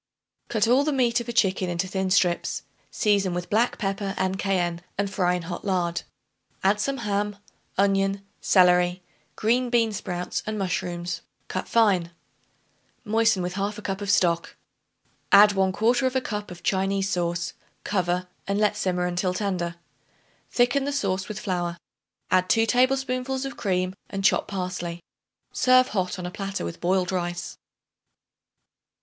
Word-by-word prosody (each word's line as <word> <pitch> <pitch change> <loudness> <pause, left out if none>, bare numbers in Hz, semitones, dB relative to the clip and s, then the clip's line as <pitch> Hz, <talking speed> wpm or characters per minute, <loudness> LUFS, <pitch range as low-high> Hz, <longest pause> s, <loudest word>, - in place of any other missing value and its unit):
Cut 220 -1 +2
all 255 +4 +5
the 305 - 0
meat 245 -3 +2
of 235 - -6
a - - 0
chicken 190 -5 +1
into 175 +2 -1
thin 190 0 -1
strips; 180 -2 +1 0.3
season 200 -4 +1
with 175 +3 -5
black 230 +4 +2
pepper, 195 -1 -2
and 190 +1 -1
cayenne, 175 -3 0 0.2
and 200 0 +1
fry 180 -2 +2
in 180 - -4
hot 175 +1 -6
lard. 175 -3 0 0.6
Add 200 +2 +3
some 275 +4 -1
ham, 205 -2 -1 0.4
onion, 195 0 +2
celery, 180 -1 +4 0.3
green 245 +3 +1
bean 230 -2 +3
sprouts 180 -3 -3
and 215 0 -2
mushrooms 180 -2 -2 0.3
cut - - -3
fine. 200 -7 +3 1.0
Moisten 220 -3 +2
with 180 0 -3
1/2 205 +2 -3
cup 195 0 -3
of 200 - -4
stock. 170 -4 +2 0.8
Add 205 +1 +8
1/4 225 +7 +2
cup 210 -1 -4
of 175 -1 -11
Chinese 195 0 +1
sauce; 175 -1 -1 0.3
cover 180 -2 0 0.2
and 200 0 0
let 210 -1 +2
simmer 180 -3 0
until 180 +1 -1
tender. 180 -4 -2 0.7
Thicken 255 +3 +2
the 285 - -1
sauce 195 -9 -1
with 215 -1 -5
flour; 175 -4 -2 0.5
add 185 0 +3
2 225 0 +4
tablespoonfuls 255 +2 +1
of 270 -2 -5
cream 185 -1 -1 0.2
and 195 -1 -3
chopped - - +3
parsley. 180 -3 -4 0.5
Serve 255 0 +5
hot 185 -2 -1
on 180 - -5
a 180 - -4
platter 195 - -4
with 85 - -6
boiled 180 +1 +1
rice. 175 -1 -3
195 Hz, 150 wpm, -25 LUFS, 180-215 Hz, 1.0 s, Add